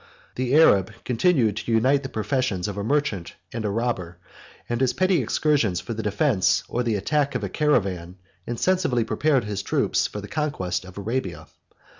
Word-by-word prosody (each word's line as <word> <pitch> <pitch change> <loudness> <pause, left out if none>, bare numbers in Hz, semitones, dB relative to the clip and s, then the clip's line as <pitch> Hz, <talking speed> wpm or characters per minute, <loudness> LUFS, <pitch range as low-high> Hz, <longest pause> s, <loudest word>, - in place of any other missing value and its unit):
The 130 +2 0
Arab 100 - +5
continued 125 - +2
to 115 - -3
unite 130 +5 +3
the 135 - -6
professions 110 -4 -1
of 100 - -4
a 100 - -3
merchant 125 - -1 0.2
and 115 -1 -3
a 105 - -1
robber; 100 -6 -2 0.5
and 120 +1 -2
his 130 - +2
petty 185 -4 +2
excursions 120 - +1
for 115 - -5
the 110 - -4
defence 100 -3 +2
or 120 - -1
the 115 -3 0
attack 140 +6 0
of 120 - -2
a 100 - -2
caravan 95 - 0 0.3
insensibly 125 0 +1
prepared 140 +2 +1
his 105 -1 -3
troops 100 - +1
for 105 - -7
the 100 - -8
conquest 95 - -2
of 95 +1 -12
Arabia. 115 +6 -3
115 Hz, 175 wpm, -24 LUFS, 100-140 Hz, 0.5 s, Arab